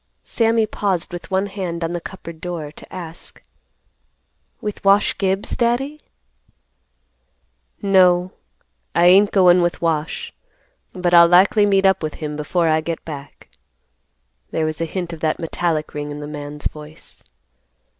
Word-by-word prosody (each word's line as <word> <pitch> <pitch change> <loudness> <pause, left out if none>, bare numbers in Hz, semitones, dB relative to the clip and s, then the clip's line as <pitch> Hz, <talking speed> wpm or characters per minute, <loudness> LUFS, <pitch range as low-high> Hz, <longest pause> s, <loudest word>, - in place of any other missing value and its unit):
Sammy 225 -1 +1
paused 195 -5 -2
with 175 - -7
one 190 0 +1
hand 185 -4 -4
on 165 +1 -2
the 175 - -3
cupboard 170 -3 -10
door 170 -4 -5
to - - -14
ask, 170 -2 -9 1.2
"With 210 -1 -6
Wash 200 +1 +4
Gibbs, 195 0 0
Daddy?" 265 +6 -1 1.8
"No, 185 -2 +4 0.6
I 170 - +4
ain't 195 +3 +6
goin' 180 -2 +5
with 175 0 0
Wash; 160 -2 -2 0.6
but 180 -2 -1
I'll 170 0 +8
likely 195 +4 +5
meet 195 -1 +3
up 190 -1 +3
with 155 -1 -4
him 150 -1 -5
before 165 +3 0
I 155 0 +2
get 165 +1 -5
back." 145 -3 -9 1.0
There 160 - -1
was 155 +1 -3
a - - +1
hint 175 +1 -4
of 165 - -8
that 155 0 0
metallic 165 -2 -2
ring 150 0 -4
in 145 0 -6
the 150 - -6
man's 150 0 -8
voice. 150 +1 -8
175 Hz, 145 wpm, -20 LUFS, 155-195 Hz, 1.8 s, I'll